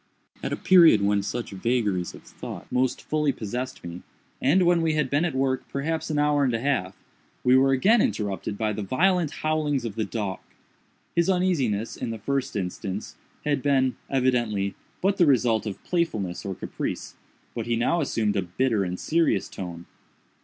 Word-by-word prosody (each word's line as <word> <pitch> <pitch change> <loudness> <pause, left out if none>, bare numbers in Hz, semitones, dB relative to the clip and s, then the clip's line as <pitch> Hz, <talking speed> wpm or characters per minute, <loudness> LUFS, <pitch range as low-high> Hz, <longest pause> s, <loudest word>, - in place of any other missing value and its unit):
At - - -3
a - - +1
period 165 - +6
when 100 0 +2
such 120 +4 -4
vagaries 100 -3 -1
of - - -14
thought - - -8
most 130 0 0
fully 150 -2 +1
possessed 125 +3 -5
me, 85 0 -7 0.4
and 170 +8 +4
when 175 -1 +4
we 160 -1 +1
had 150 -4 0
been 145 +4 +2
at 160 -6 -2
work 130 -1 0
perhaps 160 +4 -2
an 150 - -1
hour 145 -1 +3
and 125 -4 +2
a - - -1
half, 115 -8 -1 0.5
we 125 +1 +5
were 135 +1 +5
again 205 - +4
interrupted 100 -1 -2
by 110 0 0
the 105 - -4
violent 170 - +2
howlings 150 -4 -1
of 115 - -3
the 110 +1 -1
dog. 105 -4 -3 0.8
His 170 +2 +3
uneasiness, 140 - +1
in - - -4
the 115 - -4
first 135 +4 -2
instance, 95 +1 -4 0.3
had 145 -2 +1
been, 130 -2 +2
evidently, 120 -7 +1 0.3
but 195 +1 +2
the 175 - +5
result 115 -5 +3
of 100 - -6
playfulness 110 - -1
or 95 -1 -3
caprice, - - -5 0.4
but 115 -1 -4
he 120 - +1
now 145 +9 +1
assumed 110 -7 0
a 100 - +2
bitter 105 +4 0
and 90 0 -4
serious 165 +1 +1
tone. 85 -2 -7
125 Hz, 180 wpm, -25 LUFS, 105-150 Hz, 0.8 s, period